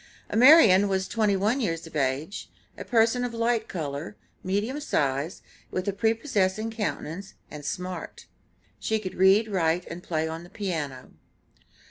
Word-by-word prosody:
Amarian 220 - +7
was 190 -1 -1
twenty 215 -3 +1
one 215 +8 +1
years 165 -7 -2
of 165 - -12
age, 145 +7 -2 0.3
a - - -7
person 230 +1 +2
of 240 -1 -3
light 230 -1 0
color, 150 +2 -5 0.3
medium 205 +9 -1
size, 145 - -1 0.3
with 185 +2 -3
a 200 - +1
prepossessing 220 -1 0
countenance 195 -4 -4 0.2
and 150 -1 -8
smart; 180 +4 -5 0.5
she 220 - 0
could 195 -4 -5
read, 195 +4 +4
write, 175 -3 0
and 170 +1 -8
play 160 -2 -2
on 160 +1 -6
the 175 - -13
piano. 160 -10 -4
190 Hz, 145 wpm, -26 LUFS, 165-220 Hz, 0.5 s, Amarian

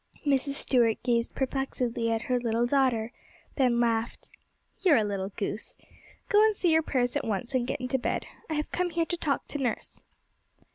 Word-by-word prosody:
Mrs. 280 0 +2
Stuart 235 -6 +2
gazed 235 -1 0
perplexedly 255 -3 -1
at 225 0 0
her 250 -1 0
little 235 0 +1
daughter, 245 -4 +1 0.4
then 250 -4 +3
laughed. 230 -1 -1 0.5
'You 365 -5 +5
are - - +6
a 220 - +3
little 200 -2 -2
goose! 205 +2 -4 0.5
Go 415 +1 +5
and 435 -1 +4
say 360 - +1
your 320 0 +5
prayers 250 -5 0
at - - 0
once, 225 +4 -3
and 250 -2 +1
get - - -2
into 255 +1 -1
bed. - - -2 0.2
I 315 - -1
have 300 0 -2
come 360 0 0
here 335 -1 0
to 350 - -2
talk 295 -4 -1
to 290 - -4
nurse.' 250 -4 -3
250 Hz, 190 wpm, -28 LUFS, 230-285 Hz, 0.5 s, are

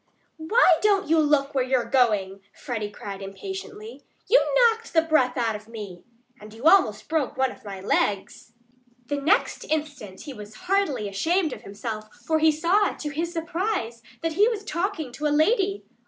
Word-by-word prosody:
"Why 390 +10 +4
don't 400 -2 +2
you 325 0 +4
look 295 -2 +2
where 265 -2 +1
you're 255 -2 0
going?" 210 -6 +1 0.2
Freddie 220 -5 -4
cried 200 -1 -8
impatiently. 385 - -8 0.2
"You - - +6
knocked 460 -2 +3
the 325 -1 +4
breath 265 -6 +2
out 230 -3 0
of 210 +1 -10
me. 205 -6 -9 0.4
And 210 +1 -12
you 230 - -12
almost 310 - +4
broke 300 -3 -1
one 265 -1 +1
of - - -15
my 195 -2 -8
legs." 200 +3 -1 0.5
The 285 +3 -3
next 375 - +1
instant 290 -11 -4
he 290 - -8
was 210 -2 -11
heartily 360 - 0
ashamed 320 - 0
of - - -9
himself; 215 +1 -7
for 315 -1 +1
he 315 0 +5
saw, 345 +7 +2
to 300 - -5
his 330 +4 -3
surprise, 335 - -3 0.2
that 330 0 -1
he 405 +6 +4
was 445 -4 -2
talking 345 -6 -3
to 300 +5 -2
a 295 0 +1
lady. 395 +3 +1
295 Hz, 175 wpm, -25 LUFS, 220-365 Hz, 0.5 s, You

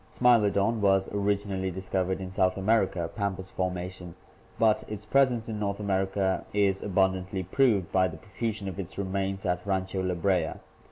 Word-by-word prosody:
Smilodon 115 -2 +3
was 95 -1 +3
originally 100 -2 0
dis 95 +1 -7
covered 95 0 0
in 95 -1 -6
South 95 -1 +1
America 95 -4 +1
(Pampas 95 -2 -3
formation), 90 -1 -4 0.4
but 110 -1 +3
its 105 -1 -6
presence 125 -1 +2
in 110 -2 -4
North 100 -1 -2
America 95 -1 0
is 100 -2 +2
abundantly 95 -1 0
proved 100 -2 +2
by 95 -1 +3
the 80 -2 -8
profusion 105 +2 -4
of 95 0 -5
its 95 -1 -6
re 100 - -1
mains 95 0 -2
at 90 -1 0
Rancho 95 -1 -1
La 90 -1 -1
Brea. 90 -3 +1
95 Hz, 165 wpm, -28 LUFS, 95-105 Hz, 0.4 s, Smilodon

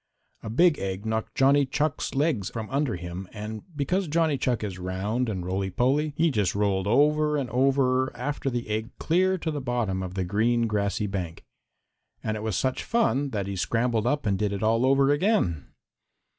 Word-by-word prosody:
A - - -6
big 165 +7 +4
egg 95 +1 -4
knocked 110 0 -2
Johnny 140 +2 +4
Chuck's 145 +2 -1
legs 140 - +1
from 110 -2 -6
under 140 -4 0
him 90 +2 -6
and, 105 0 -6
because 180 +7 0
Johnny 160 -1 +2
Chuck 125 -4 -1
is 95 -3 -5
round 100 +7 -2
and 95 -4 -3
roly 95 +1 -1
poly, 140 +8 +1
he 165 0 +3
just 105 -8 0
rolled 100 -2 +1
over 150 +5 +3
and 130 -5 -3
over 130 0 +2
after 140 +2 -2
the 120 -2 -3
egg 110 +2 -2
clear 185 +3 +2
to 165 -2 -3
the 145 -2 -3
bottom 120 -7 -1
of 90 0 -6
the 95 - 0
green 115 +5 +1
grassy 105 -1 -1
bank. 90 -5 -4 0.8
And 110 - -1
it 105 - -5
was 110 -5 -1
such 130 -1 -1
fun 145 - +1
that 105 -6 -2
he 100 0 -4
scrambled 115 +3 0
up 145 +1 0
and 100 -2 +1
did 105 -1 0
it 100 - -3
all 115 +3 +3
over 135 +1 +4
again. 145 - +1
115 Hz, 190 wpm, -26 LUFS, 100-140 Hz, 0.8 s, big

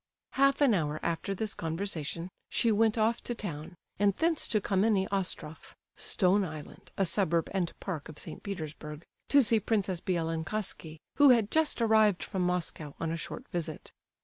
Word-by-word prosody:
Half 275 +1 +3
an 275 -5 +5
hour 155 -5 0
after 170 +4 -1
this 215 +2 -2
conversation, 165 0 -3 0.2
she 230 - +2
went 220 +1 +3
off 225 +2 +2
to 240 - -3
town, 170 -5 -6 0.2
and 200 -1 +3
thence 330 -1 +2
to 215 - +1
the - - -8
Kammenny 195 0 +2
Ostrof, 180 -5 -3 0.2
["Stone 195 +1 +2
Island," 155 -4 -8
a 195 - +2
suburb 170 -2 +2
and 180 -3 0
park 165 -7 -5
of 155 - -10
St. - - -7
Petersburg] 155 -5 -6 0.2
to 280 -1 +6
see 225 0 +4
Princess 195 -4 -1
Bielokonski, 165 0 -2 0.2
who 285 -1 +8
had 230 -4 +4
just 315 -6 +2
arrived 220 -4 +4
from 190 -3 -3
Moscow 175 -4 -2
on 165 -1 -2
a - - -1
short 240 +9 -6
visit. 165 -3 -4
190 Hz, 170 wpm, -30 LUFS, 165-220 Hz, 0.2 s, who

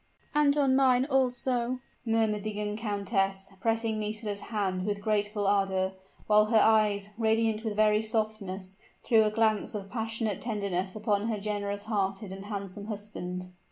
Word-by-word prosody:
"And 295 -1 +4
on 270 -2 +4
mine 260 -1 +4
also," 255 -2 +1 0.3
murmured 220 -2 +1
the 215 - -2
young 210 0 -3
countess, 200 -3 -1
pressing 225 -1 0
Nisida's 210 -1 -3
hand 195 -4 -1
with 205 0 -1
grateful 210 0 0
ardor, 195 -1 +2 0.3
while 210 0 +5
her 220 +1 +3
eyes, 210 -2 +3
radiant 220 -1 +2
with 220 -2 -2
very 215 0 +4
softness, 215 -4 -3 0.3
threw 225 -2 +5
a - - +3
glance 215 -1 +1
of 195 -1 -6
passionate 225 -2 -2
tenderness 200 -4 -2
upon 210 0 0
her 220 -2 -1
generous 205 -1 -3
hearted 200 -2 -1
and 195 +1 -7
handsome 200 -1 -5
husband. 180 -4 -5
210 Hz, 150 wpm, -29 LUFS, 200-225 Hz, 0.3 s, while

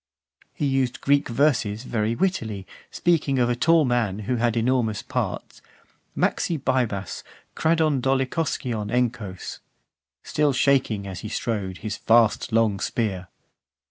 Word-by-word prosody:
XXIII. - - -37
He - - -1
used 135 -2 0
Greek 140 0 +2
verses 120 -5 +1
very 115 -2 -1
wittily; 115 - -1 0.2
speaking 155 -6 +1
of 120 -1 +2
a - - 0
tall 160 +5 +4
man, 120 -6 0
who 120 +4 -1
had 120 0 +1
enormous 115 -3 +1
parts: - - -4 0.6
Makxi 170 - +1
bibas, 120 -8 -1 0.3
kradon 160 -4 +2
dolichoskion 130 -4 -1
enchos; 120 -6 -2 0.6
Still 150 -2 +1
shaking, 125 -6 +2
as 95 -2 -6
he 110 - -6
strode, 100 -5 -3
his 105 +1 -5
vast 115 0 +3
long 110 -3 +2
spear. 95 -3 -2
120 Hz, 130 wpm, -24 LUFS, 105-135 Hz, 0.6 s, tall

